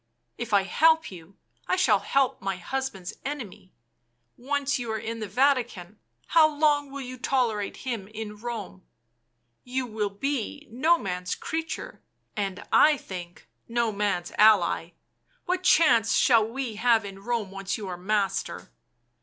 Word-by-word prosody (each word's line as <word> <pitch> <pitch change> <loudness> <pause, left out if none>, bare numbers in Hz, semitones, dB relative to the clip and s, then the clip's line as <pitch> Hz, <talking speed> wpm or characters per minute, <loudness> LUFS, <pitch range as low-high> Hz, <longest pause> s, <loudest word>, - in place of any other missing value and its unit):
if 240 0 -6
I 200 -1 +4
help 320 - +3
you 180 +1 -12 0.3
I - - +2
shall 230 - +4
help 270 +3 +1
my 195 -1 -2
husband's 205 -1 -4
enemy 245 -10 -6 0.4
— 120 0 -48
once 280 +1 -1
you 235 -2 -4
are 220 - -1
in 225 +2 -5
the 215 - -4
Vatican, 225 -5 0 0.3
how 315 -2 +6
long 290 -1 +2
will 280 0 -6
you 255 -1 -8
tolerate 235 -6 0
him 230 -7 -3
in 215 -1 -7
Home? 220 -5 -6 0.8
You 255 +1 -2
will 215 -3 -2
be 275 +6 -3
no 315 +9 +3
man's 180 - -3
creature, 320 0 -5 0.3
and, 195 -2 -3
I 300 -1 +6
think, 175 -6 -9 0.2
no 235 -1 0
man's 200 -4 -1
ally— 200 -5 +4 0.5
what 365 +1 0
chance 255 -11 +4
shall 230 -4 +4
we 235 -2 -4
have 230 -2 +3
in 195 -1 -8
Rome 225 -2 -2
once 195 0 -3
you 210 -3 -6
are 180 - -4
master? 190 - -2
225 Hz, 150 wpm, -26 LUFS, 195-270 Hz, 0.8 s, how